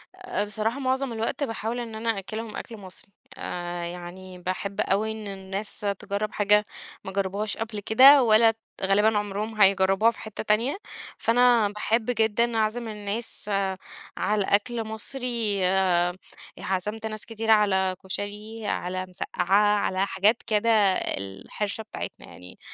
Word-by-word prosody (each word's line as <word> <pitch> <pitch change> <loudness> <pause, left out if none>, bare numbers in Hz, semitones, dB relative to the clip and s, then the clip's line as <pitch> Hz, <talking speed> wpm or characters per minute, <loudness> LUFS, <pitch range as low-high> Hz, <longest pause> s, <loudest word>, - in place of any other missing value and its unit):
آآ، 370 - -2
بصراحة 220 +5 -1
معظم 265 -1 -1
الوقت 225 +5 -2
باحاول 225 -1 -3
إن 230 -2 -6
أنا 225 +1 -3
أأكلهم 215 +3 -6
أكْل 230 - -7
مصري، 190 0 -8 0.3
آآ 175 -1 -4
يعني 180 +1 -8
باحب 185 +2 -3
أوي 215 +3 +1
إن 220 -1 -6
الناس 195 +1 -4 0.2
تجرّب 205 +1 -3
حاجة 210 0 +3 0.4
ما 190 - -6
جربوهاش 200 +2 -2
قبل 220 -1 -4
كده 260 +7 +7
ولا 225 0 +6 0.3
غالبًا 210 +3 +3
عمرهم 210 +1 -3
هيجربوها 195 +3 +5
في - - -15
حتّة 215 -1 -6
تانية، 225 - +1 0.4
فأنا 240 -2 +4
باحب 215 +2 0
جدًا 230 0 +1
اعزم 220 +2 0
الناس 210 +1 -4 0.7
على 210 0 +1
أكْل 225 +4 +1
مصري. 225 -2 -1 1.0
عزمت 210 +4 -3
ناس 215 -1 -3
كتيرة 225 0 -1
على 190 -3 +2
كُشري 210 +3 -5
على 185 0 -2
مسقّّعة 195 +3 +1
على 190 -1 0
حاجات 205 +5 +2
كده 220 +1 +2 0.5
الحِرشة 145 - -4
بتاعتنا 220 - -7
يعني، 90 0 -12
210 Hz, 130 wpm, -26 LUFS, 195-225 Hz, 1.0 s, كده